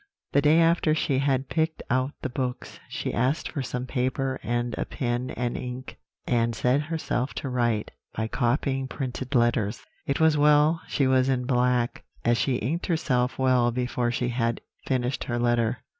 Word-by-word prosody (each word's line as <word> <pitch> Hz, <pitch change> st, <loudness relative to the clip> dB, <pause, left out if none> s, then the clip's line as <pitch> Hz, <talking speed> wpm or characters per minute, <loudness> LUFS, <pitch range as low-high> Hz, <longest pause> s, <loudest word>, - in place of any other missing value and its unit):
"The 140 Hz, -, +4 dB
day 150 Hz, +3 st, +5 dB
after 165 Hz, -2 st, +3 dB
she 140 Hz, -4 st, +1 dB
had 135 Hz, -1 st, +1 dB
picked 160 Hz, 0 st, -1 dB
out 130 Hz, +3 st, 0 dB
the 130 Hz, -, -1 dB
books, 125 Hz, 0 st, -4 dB
she -, -, -3 dB
asked 130 Hz, +6 st, 0 dB
for 145 Hz, -, -3 dB
some 125 Hz, 0 st, -4 dB
paper 130 Hz, 0 st, -1 dB
and 120 Hz, +2 st, -1 dB
a -, -, +1 dB
pen 120 Hz, 0 st, -2 dB
and 120 Hz, -1 st, -1 dB
ink, 125 Hz, +1 st, -6 dB, 0.3 s
and 115 Hz, -1 st, +1 dB
set 125 Hz, +5 st, +2 dB
herself 150 Hz, -5 st, -2 dB
to 135 Hz, -, -4 dB
write, 120 Hz, -4 st, 0 dB, 0.2 s
by 110 Hz, 0 st, -1 dB
copying 135 Hz, +2 st, 0 dB
printed 130 Hz, 0 st, -4 dB
letters. 120 Hz, -3 st, +1 dB, 0.2 s
It -, -, 0 dB
was 160 Hz, -1 st, +4 dB
well 150 Hz, +2 st, +4 dB
she 140 Hz, -, +1 dB
was 130 Hz, 0 st, +3 dB
in 125 Hz, -2 st, 0 dB
black, 125 Hz, -1 st, +1 dB, 0.2 s
as 120 Hz, 0 st, +3 dB
she 135 Hz, -, +1 dB
inked 145 Hz, +9 st, -2 dB
herself 130 Hz, -7 st, 0 dB
well 130 Hz, -2 st, +3 dB
before 125 Hz, 0 st, -1 dB
she 120 Hz, +1 st, -1 dB
had 115 Hz, -1 st, -1 dB, 0.3 s
finished 130 Hz, -1 st, -1 dB
her 120 Hz, -, -2 dB
letter. 120 Hz, 0 st, +1 dB
125 Hz, 175 wpm, -26 LUFS, 120-140 Hz, 0.3 s, day